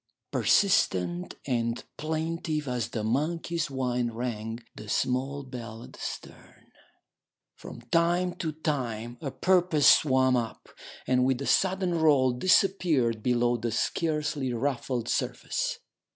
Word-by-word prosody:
Persistent 90 - +2
and 115 -3 -1
plaintive 160 -1 -2
as 125 -2 -1
the 110 - -4
monkey's 160 +7 -1
whine 125 -3 -1
rang 115 -1 -4
the 105 - -10
small 135 +5 -1
bell 120 -3 -8
at - - -13
the - - -14
stern. - - -9 0.8
From - - -10
time 170 +7 +1
to 160 -3 -2
time 125 -7 -3
a 140 - -3
porpoise 175 -2 +2
swam 130 -3 +5
up, 115 -2 -3 0.4
and 125 0 +2
with 130 -1 +1
a 140 - -4
sudden 185 +1 +2
roll 140 -5 +4
disappeared 155 - +2
below 120 0 +2
the 115 0 -3
scarcely 150 +1 -1
ruffled 125 -1 -2
surface. - - -2
130 Hz, 125 wpm, -28 LUFS, 120-160 Hz, 0.8 s, swam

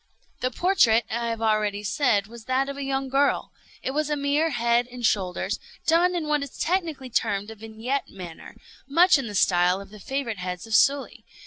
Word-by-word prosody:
The 255 - 0
portrait, 240 - +3
I 235 +1 -1
have 230 -1 -3
already 210 -2 +1
said, 210 -2 +1
was 225 +1 -12
that 260 +1 +1
of 280 - -5
a 280 - -6
young 270 0 -1
girl. 275 +2 +1 0.3
It - - -1
was 300 +2 -1
a 295 - +1
mere 290 +3 +1
head 235 -2 +1
and 245 -1 -5
shoulders, 185 -4 0 0.3
done 350 +2 +3
in 325 -3 -2
what 300 -1 +1
is 280 -2 -7
technically 320 -7 -1
termed 205 -2 -1
a - - -9
vignette 225 +5 -4
manner; 175 -4 -10 0.3
much 340 +3 +5
in 265 - -4
the 205 - -6
style 180 0 +3
of 200 0 -11
the 210 - -12
favorite 240 -3 -3
heads 180 +1 -5
of 225 - -7
Sully. 275 +4 +2
245 Hz, 200 wpm, -25 LUFS, 215-280 Hz, 0.3 s, much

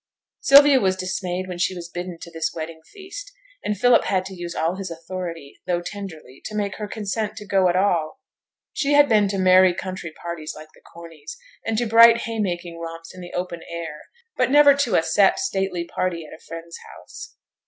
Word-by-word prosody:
Sylvia 280 0 +7
was 190 -3 +1
dismayed 185 0 -3
when 180 -1 -6
she 185 +2 0
was 170 -1 -7
bidden 175 0 -6
to 170 - -9
this 165 -1 -2
wedding 160 0 -6
feast, 415 +6 -9 0.3
and 210 - -2
Philip 245 +2 +5
had 185 -1 0
to 190 - -8
use 175 -1 -6
all 165 +4 -1
his 195 -2 -5
authority, 165 -2 -7
though 175 -1 +1
tenderly, 175 -10 -9
to 215 - -6
make 200 -2 -2
her 210 - -5
consent 215 +1 -3
to 210 - -8
go 195 -2 +3
at 175 - 0
all. 185 +2 +1 0.5
She 290 -1 0
had 290 0 +6
been 210 -4 +4
to 195 0 -2
merry 185 -1 +5
country 185 -3 -6
parties 165 -1 -7
like 155 0 -12
the - - -21
Corneys', 170 - -12 0.3
and 225 -1 0
to 240 - +1
bright 230 +1 +7
haymaking 175 -7 -3
romps 165 0 -8
in 185 - -11
the 175 - -10
open 180 -1 -4
air; 165 -3 -6 0.3
but 255 -1 +1
never 290 +1 +7
to 280 -4 0
a 160 - +3
set 175 +4 +3
stately 190 - -2
party 170 -2 -3
at - - -12
a - - -12
friend's 165 0 -9 0.2
house. 295 0 -11
185 Hz, 200 wpm, -23 LUFS, 170-215 Hz, 0.5 s, Sylvia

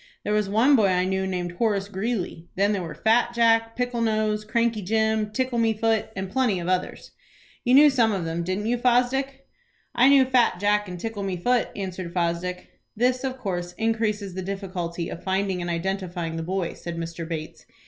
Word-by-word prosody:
There 210 - -1
was 210 -2 +1
one 235 +8 +4
boy 215 -5 +4
I 180 -1 +2
knew 190 0 -1
named 180 -2 -3
'Horace 205 -4 +1
Greeley'. 195 -4 -3
Then 200 +2 +2
there 200 - -1
were 165 -3 -6
'Fat 235 +6 +2
Jack,' 225 -1 +3
'Pickle 245 -1 -2
Nose,' 215 -1 0
'Cranky 230 0 0
Jim,' 220 +2 +1
'Tickle 255 +1 -1
me 225 -1 +2
foot,' 220 0 0
and 190 0 -3
plenty 245 -5 +1
of 170 - -5
others. 185 0 -2 0.5
You 250 0 +4
knew 295 +1 +8
some 235 -4 +3
of 190 -5 -2
them, 165 +1 -2
didn't 185 +4 -2
you, 240 +2 0
Fosdick?" 265 +3 +1 0.5
"I 250 +3 +5
knew 275 -2 +6
'Fat 250 -8 +2
Jack' 205 +1 +2
and 180 -1 -7
'Tickle 225 +1 -4
me 190 -2 -2
Foot,'" 245 +6 +1
answered 185 -3 -5
Fosdick. 175 +1 -2 0.2
"This 250 +2 +1
of 260 -1 -3
course 180 -7 -4
increases 220 -3 -1
the 190 - -4
difficulty 180 -3 -4
of - - -8
finding 190 -1 -1
and 175 - -3
identifying 175 -1 -3
the 165 - -3
boy," 180 +1 -2
said 170 -1 -7
Mr. 165 0 -5
Bates. 160 -2 -6
205 Hz, 195 wpm, -25 LUFS, 180-230 Hz, 0.5 s, knew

